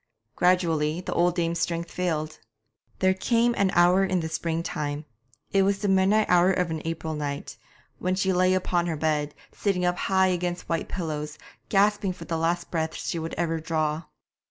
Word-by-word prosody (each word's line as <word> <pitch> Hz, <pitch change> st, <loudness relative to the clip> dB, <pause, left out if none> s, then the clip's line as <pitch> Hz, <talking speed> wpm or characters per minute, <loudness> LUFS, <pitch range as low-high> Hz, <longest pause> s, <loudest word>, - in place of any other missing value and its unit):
Gradually 165 Hz, -3 st, +2 dB
the -, -, -4 dB
old 175 Hz, 0 st, +2 dB
dame's 170 Hz, -1 st, 0 dB
strength 170 Hz, 0 st, -2 dB
failed. 155 Hz, -4 st, -2 dB, 0.6 s
There 190 Hz, 0 st, +3 dB
came 235 Hz, +5 st, +2 dB
an 200 Hz, -1 st, +2 dB
hour 180 Hz, +2 st, +5 dB
in 185 Hz, -1 st, +1 dB
the 160 Hz, -1 st, -3 dB
spring 165 Hz, +1 st, -2 dB
time 145 Hz, -1 st, -3 dB, 0.5 s
it 195 Hz, -, +4 dB
was 195 Hz, +1 st, +2 dB
the 205 Hz, +1 st, -2 dB
midnight 195 Hz, +3 st, +4 dB
hour 180 Hz, +1 st, +5 dB
of 180 Hz, -3 st, 0 dB
an 160 Hz, -1 st, -3 dB
April 160 Hz, -1 st, -3 dB
night 145 Hz, -2 st, -4 dB, 0.4 s
when 185 Hz, +1 st, 0 dB
she 190 Hz, 0 st, +1 dB
lay 185 Hz, +1 st, +3 dB
upon 175 Hz, -2 st, 0 dB
her 160 Hz, -2 st, -2 dB
bed, 150 Hz, -1 st, 0 dB, 0.2 s
sitting 185 Hz, -3 st, 0 dB
up 180 Hz, 0 st, +1 dB
high 190 Hz, -1 st, +2 dB
against 180 Hz, 0 st, -2 dB
white 165 Hz, -1 st, -1 dB
pillows, 155 Hz, -4 st, -4 dB, 0.3 s
gasping 205 Hz, -1 st, +2 dB
for -, -, -10 dB
the 165 Hz, -, -2 dB
last 170 Hz, +1 st, -1 dB
breaths 160 Hz, -2 st, -2 dB
that -, -, -3 dB
she 170 Hz, -, -2 dB
would 165 Hz, +1 st, -5 dB
ever 165 Hz, -1 st, -1 dB
draw. 155 Hz, -1 st, -1 dB
175 Hz, 185 wpm, -26 LUFS, 160-185 Hz, 0.6 s, hour